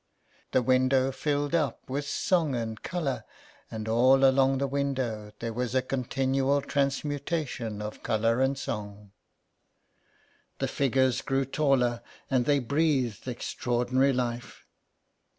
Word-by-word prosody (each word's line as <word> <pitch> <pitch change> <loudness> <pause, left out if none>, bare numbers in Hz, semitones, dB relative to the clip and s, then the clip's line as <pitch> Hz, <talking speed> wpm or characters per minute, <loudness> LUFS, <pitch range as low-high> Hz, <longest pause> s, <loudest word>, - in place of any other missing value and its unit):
The 130 - +2
window 130 +1 +3
filled 145 +2 -1
up 150 -7 0
with 140 +2 -3
song 160 -3 +1
and 110 -2 -4
colour, 160 -8 -2 0.5
and 110 -1 -6
all 130 +4 +5
along 135 0 +4
the 140 - 0
window 130 -6 -2
there 115 -1 -4
was 125 +1 -2
a 130 - +3
continual 135 +2 0
transmutation 140 -5 -2
of 105 - -7
colour 115 +2 +1
and 135 +1 +1
song. 105 -4 -6 1.5
The - - -1
figures 130 -2 +1
grew 135 0 0
taller, 130 -4 +1 0.3
and 125 -2 +2
they 145 -1 +3
breathed 135 -4 0
extraordinary 125 +2 0
life. 120 -2 -3
130 Hz, 120 wpm, -28 LUFS, 120-140 Hz, 1.5 s, all